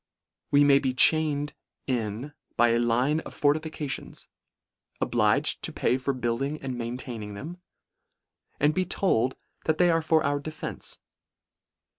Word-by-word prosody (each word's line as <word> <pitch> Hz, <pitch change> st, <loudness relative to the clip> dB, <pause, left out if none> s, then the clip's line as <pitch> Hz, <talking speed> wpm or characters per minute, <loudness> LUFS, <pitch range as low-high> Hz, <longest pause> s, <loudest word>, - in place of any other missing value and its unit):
We 145 Hz, 0 st, +5 dB
may 140 Hz, -1 st, +6 dB
be 130 Hz, -2 st, -1 dB
chained 150 Hz, 0 st, +3 dB, 0.3 s
in 120 Hz, +2 st, -3 dB, 0.2 s
by 120 Hz, 0 st, +5 dB
a 115 Hz, 0 st, +3 dB
line 125 Hz, +6 st, +2 dB
of -, -, -9 dB
fortifications: 150 Hz, -1 st, -2 dB, 0.7 s
obliged -, -, +2 dB
to -, -, -2 dB
pay 130 Hz, -, +1 dB
for 135 Hz, +2 st, 0 dB
building 130 Hz, +4 st, -2 dB
and 130 Hz, -2 st, -4 dB
maintaining 115 Hz, -3 st, -5 dB
them; 170 Hz, -, -8 dB, 1.0 s
and 150 Hz, +2 st, +3 dB
be 185 Hz, -, +1 dB
told 130 Hz, -, +1 dB, 0.3 s
that 155 Hz, -1 st, +1 dB
they 175 Hz, -1 st, +4 dB
are 165 Hz, 0 st, +2 dB
for 160 Hz, 0 st, +2 dB
our 145 Hz, 0 st, +1 dB
defence. 155 Hz, +1 st, -6 dB
140 Hz, 135 wpm, -27 LUFS, 120-155 Hz, 1.0 s, may